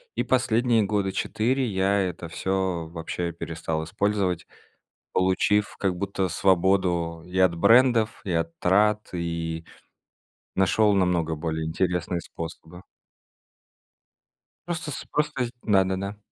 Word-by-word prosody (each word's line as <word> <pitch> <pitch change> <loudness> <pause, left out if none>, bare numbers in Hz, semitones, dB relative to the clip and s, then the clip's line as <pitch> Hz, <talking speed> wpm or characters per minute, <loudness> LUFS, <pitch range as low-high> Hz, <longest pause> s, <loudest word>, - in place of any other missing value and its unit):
И - - 0
последние 120 -2 +2
года 100 -1 0
4 130 +7 0
я 100 0 +1
это 90 -3 -3
всё 95 -3 -1
вообще 85 +1 -4
перестал 80 -1 -4
использовать, 95 +1 -1 0.7
получив 95 +3 +2
как 95 -2 0
будто 95 0 -1
свободу 90 -3 +1
и 90 +1 -5
от 95 -2 +4
брендов, 115 +2 +4
и 95 - -2
от 85 0 -2
трат, 105 +3 +2
и 85 -1 -3 0.9
нашёл 105 +2 +3
намного 90 -4 +1
более 80 0 -3
интересные 90 +1 -1
способы. 85 +2 -9 1.8
Просто 165 -3 -3
с - - -6
просто 145 -4 0
зд 120 - -8
да-да-да. 95 0 +1
95 Hz, 115 wpm, -25 LUFS, 85-105 Hz, 1.8 s, от